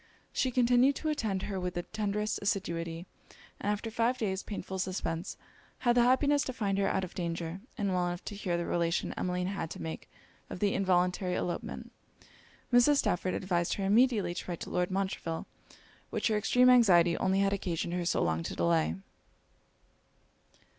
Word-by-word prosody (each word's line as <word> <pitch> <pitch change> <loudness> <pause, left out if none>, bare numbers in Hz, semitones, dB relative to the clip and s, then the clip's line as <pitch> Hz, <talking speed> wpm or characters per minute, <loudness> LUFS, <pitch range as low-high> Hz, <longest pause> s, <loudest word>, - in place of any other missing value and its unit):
She 260 - +1
continued 250 +2 +4
to 310 - -2
attend 215 -10 -1
her 195 -2 -3
with 180 -1 -3
the 175 - -2
tenderest 210 +1 -2
assiduity; 170 -4 -2 0.5
and 205 - 0
after 215 +2 -3
five 230 +3 +1
days 195 -5 -1
painful 190 -2 -6
suspence, 185 -2 -3 0.4
had 240 -1 +2
the 245 - +5
happiness 280 +4 +4
to 260 - -4
find 200 -5 -1
her 195 - +2
out 190 -1 0
of 180 - -6
danger, 170 0 -4 0.2
and 200 -4 0
well 180 -1 +1
enough 175 0 -5
to 205 - -5
hear 180 -4 -1
the 170 - -2
relation 170 -1 0
Emmeline 180 0 -2
had 190 -4 -3
to - - -8
make 80 -1 -6 0.4
of - - -6
the 200 0 +2
involuntary 180 -1 +1
elopement. 175 - -4 0.8
Mrs. 245 +4 +6
Stafford 185 -6 0
advised 175 -3 0
her 195 - -2
immediately 210 -3 +3
to - - -6
write 175 - -4
to - - -6
Lord 180 0 0
Montreville; 190 -4 -2 0.6
which - - 0
her 215 - +2
extreme 250 +4 +4
anxiety 180 -9 +6
only 190 +1 +2
had 200 0 +2
occasioned 175 -3 -2
her 180 0 -1
so 175 - +1
long 80 0 0
to - - -5
delay. 80 -1 +2
190 Hz, 175 wpm, -30 LUFS, 175-215 Hz, 0.8 s, Mrs